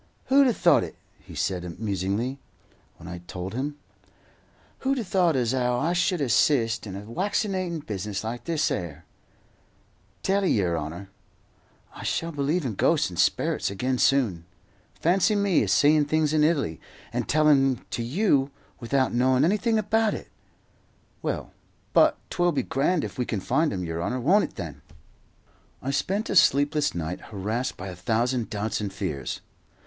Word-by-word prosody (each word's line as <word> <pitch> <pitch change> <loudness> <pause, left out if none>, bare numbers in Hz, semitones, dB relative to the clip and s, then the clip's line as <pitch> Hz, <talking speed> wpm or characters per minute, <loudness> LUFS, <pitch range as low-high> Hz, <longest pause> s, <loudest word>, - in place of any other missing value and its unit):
"Who'd 275 +1 +6
'a 245 - +3
thought 170 - +4
it?" 85 - -7 0.2
he - - -13
said 90 -3 -3
musingly, 105 +5 -2 0.6
when 85 - -12
I - - -6
had 85 0 -9
told 95 +2 -6
him. 140 +4 -3 1.0
"Who'd 270 +1 0
'a 240 - -1
thought 180 -4 +2
as 125 -1 +1
'ow 125 -1 +1
I 165 +6 +1
should 180 -1 +1
hassist 115 -3 +2
in 95 - -6
a 100 - -6
waccinatin' 185 - -2
business 105 0 -4
like 115 +2 -5
this 160 -2 0
'ere! 85 -2 -4 1.2
Tell 195 +1 +2
'ee, 190 - +2
yer 90 -4 +1
'onour, 85 +5 -6 0.8
I - - -10
shall 165 0 -1
believe 150 +2 -1
in 120 - -2
ghosts - - +2
and - - -7
sperrits - - +1
again 125 +6 -1
soon. 110 -12 +2 0.5
Fancy 190 +5 +3
me 200 -4 +3
a - - 0
seein' 150 0 +4
things 155 0 +1
in 155 -1 +3
Italy 140 - +1 0.3
and - - -2
tellin' 145 -3 +4
'em - - -22
to - - -2
you 140 - +2 0.3
without 130 +2 0
knowin' 130 +2 +3
anything 215 +5 +2
about 215 +1 +1
it! - - -9 0.9
Well, - - -3 0.4
but - - +5
'twill 175 -1 +2
be 145 - 0
grand 150 +5 +1
if - - -6
we 125 - +1
can 110 - -2
find 155 - +1
'im, 95 -2 -3
yer 85 -1 -3
honour, 125 +8 -2
won't 185 - +4
it - - -11
then?" - - -7 1.0
I 135 - -3
spent 195 +10 -1
a - - -1
sleepless 145 - +4
night, 85 +1 -4
harassed 110 +5 -3
by 95 +1 -6
a 90 - -7
thousand 115 +5 0
doubts 105 +1 -2
and 100 -2 -3
fears. 75 -9 -4
130 Hz, 170 wpm, -26 LUFS, 100-170 Hz, 1.2 s, Who'd